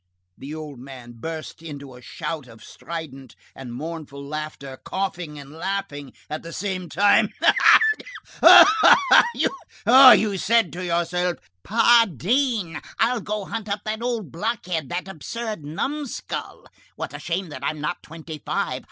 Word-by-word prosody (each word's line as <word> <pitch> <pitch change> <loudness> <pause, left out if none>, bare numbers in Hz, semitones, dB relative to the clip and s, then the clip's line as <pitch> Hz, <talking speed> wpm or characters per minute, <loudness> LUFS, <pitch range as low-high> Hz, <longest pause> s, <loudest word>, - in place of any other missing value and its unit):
The 140 +7 -8
old 150 -4 -8
man 125 -2 -11
burst 160 +2 -7
into 140 -5 -9
a 125 - -14
shout 150 +1 -6
of 115 -2 -15
strident 135 -7 -9 0.2
and 130 -3 -9
mournful 145 0 -7
laughter, 150 -3 -7
coughing 180 -5 -4
and 140 -1 -11
laughing 160 -5 -5 0.2
at 155 - -5
the 165 - -10
same 185 -2 -4
time. 205 +2 +3
"Ah! - - +6 0.6
ah! 415 -3 +8 0.6
ah! 255 +3 +9
You 205 -1 0
said 230 -3 +2
to 180 +1 -6
yourself: 175 0 -1 0.2
'Pardine! 225 - +2 0.2
I'll 235 0 +1
go 210 0 -4
hunt 220 0 -6
up 200 +1 -2
that 215 +1 -3
old 235 -5 -3
blockhead, 180 - -3
that 175 +2 -4
absurd 210 +2 -6
numskull! 275 - -5 0.3
What - - -6
a - - -7
shame 175 +1 -3
that 140 -3 -9
I'm 155 +2 -2
not 150 - -4
twenty 160 -1 -10
five! - - -2
170 Hz, 145 wpm, -23 LUFS, 150-210 Hz, 0.6 s, ah